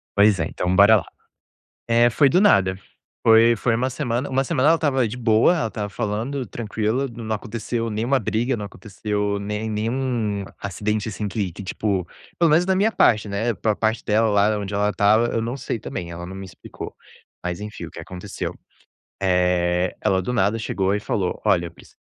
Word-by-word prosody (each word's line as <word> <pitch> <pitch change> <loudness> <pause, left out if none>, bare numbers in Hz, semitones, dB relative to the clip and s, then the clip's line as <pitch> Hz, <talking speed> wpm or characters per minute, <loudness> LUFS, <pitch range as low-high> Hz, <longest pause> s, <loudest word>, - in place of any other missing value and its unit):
Pois 100 -1 +5
é, 80 - +1
então 90 +1 -1
bora 100 +3 +7
lá. 85 - -3 0.8
Eh, 120 +1 +5
foi 140 +4 +4
do 180 +7 +3
nada 95 - +4 0.5
foi 115 +1 +6
foi 120 +2 +1
uma 125 +3 0
semana 125 -1 -2
uma 135 +1 +1
semana 130 +2 +2
ela 165 - +6
estava 135 -7 +1
de 110 - -6
boa, 115 +6 +4
ela 130 -9 -1
tava 105 -2 -4
falando 115 +6 -3
tranquila, 115 +4 -2
não 110 -2 -4
aconteceu 115 +2 -3
nenhuma 120 +6 +1
briga, 120 +3 -1
não 105 - -5
aconteceu 105 0 -3
nem 105 +2 -3
nenhum 110 -2 -1 0.2
acidente, 105 +3 -2
assim, 105 0 -4
que 100 -2 -2
que 100 - -9
tipo 95 -1 -2 0.3
pelo 170 -2 +4
menos 165 +4 +4
da 190 0 +2
minha 210 +4 +2
parte, 110 - +3
né, 110 +4 -1
pra 110 +1 0
parte 110 +1 -1
dela 110 +1 +2
lá, 105 +1 +2
onde 100 0 -5
ela 105 +1 +2
estava, 110 +3 +3
eu 115 - -1
não 120 +4 -3
sei 125 -3 -4
também, 85 -3 -6
ela 85 +1 -7
não 95 +1 -8
me 95 - -7
explicou, 95 - -10 0.5
mas 90 +1 -4
enfim, 105 -5 -7
o - - -11
que - - -11
aconteceu? 90 +4 -6 0.7
Eh, 90 -1 +1
ela 95 -1 +1
do 110 - -3
nada 105 -1 +1
chegou 95 -2 -1
e - - -1
falou: 95 -3 -2
"Olha, 95 -5 +3
eu 85 - -7
preciso - - -19
105 Hz, 195 wpm, -22 LUFS, 100-120 Hz, 0.8 s, bora